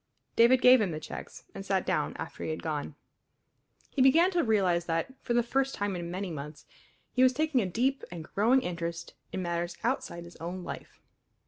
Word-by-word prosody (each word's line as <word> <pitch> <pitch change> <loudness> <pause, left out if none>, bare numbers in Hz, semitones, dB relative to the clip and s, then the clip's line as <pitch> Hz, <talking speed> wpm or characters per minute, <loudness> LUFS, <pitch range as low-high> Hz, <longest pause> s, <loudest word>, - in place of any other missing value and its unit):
David 245 +2 +5
gave 250 -1 +8
him 200 - +1
the 155 -2 -4
checks, 155 - -8
and 195 - -7
sat 195 -1 0
down 160 -5 0
after 160 - -7
he - - -3
had 155 - -4
gone. 150 -2 -3 1.0
He 275 - 0
began 325 +8 +6
to 350 -2 +2
realize 185 -7 +2
that, 165 +9 -1
for 240 - -1
the 240 - +4
first 270 +3 0
time 205 -1 -2
in 170 -1 -4
many 185 +1 -4
months, 150 0 -7 0.5
he 255 - +1
was 255 0 +6
taking 300 -2 +1
a 195 - -1
deep 255 +9 0
and 170 -2 -6
growing 230 +10 +2
interest 170 -2 -4 0.2
in 190 - -3
matters 170 0 -2
outside 255 -8 -2
his 170 - -13
own 175 +2 -5
life. - - -8
190 Hz, 200 wpm, -29 LUFS, 170-255 Hz, 1.0 s, gave